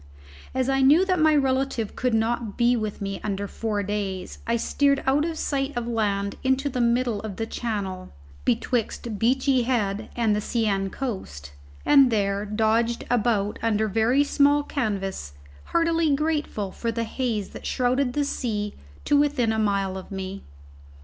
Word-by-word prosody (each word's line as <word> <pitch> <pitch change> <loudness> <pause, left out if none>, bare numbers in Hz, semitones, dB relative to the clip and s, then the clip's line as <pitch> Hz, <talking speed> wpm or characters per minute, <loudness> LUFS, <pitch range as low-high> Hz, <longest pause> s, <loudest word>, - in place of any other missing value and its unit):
As 260 -1 +1
I 270 0 +2
knew 300 +8 +6
that 370 -2 +1
my 310 -1 +5
relative 265 -5 0
could 250 -3 0
not 225 -1 -1
be 240 0 +4
with 215 -3 -3
me 195 0 -4
under 200 -1 -2
four 210 -1 -2
days, 195 -2 -4
I 230 - +2
steered 280 +4 +1
out 280 +3 +3
of 330 -1 -3
sight 275 -1 -1
of 240 -1 -2
land 200 -3 -1
into 265 +2 +1
the 250 -2 -2
middle 235 -2 +1
of 215 -3 -6
the 225 - -2
Channel, 200 -6 -4 0.3
betwixt 235 -2 -1
Beachy 260 +3 +2
Head 220 -4 -1
and 225 -3 +2
the 210 - -1
Seine 200 -4 0
coast, 190 - -5 0.3
and 275 -3 +6
there 200 -2 0
dodged 225 +2 +1
about 215 -3 +1
under 220 -1 +1
very 225 +7 +3
small 290 0 +3
canvas, 195 - -3 0.3
heartily 330 -3 +2
grateful 295 -10 -1
for 230 +3 -3
the 230 0 -2
haze 225 -3 -2
that - - -8
shrouded 250 +1 +1
the 290 +1 0
sea 210 -7 -2 0.3
to 290 - +3
within 285 -5 +2
a 220 - 0
mile 195 -2 0
of 185 - -12
me. 190 0 -5
230 Hz, 165 wpm, -25 LUFS, 205-265 Hz, 0.3 s, knew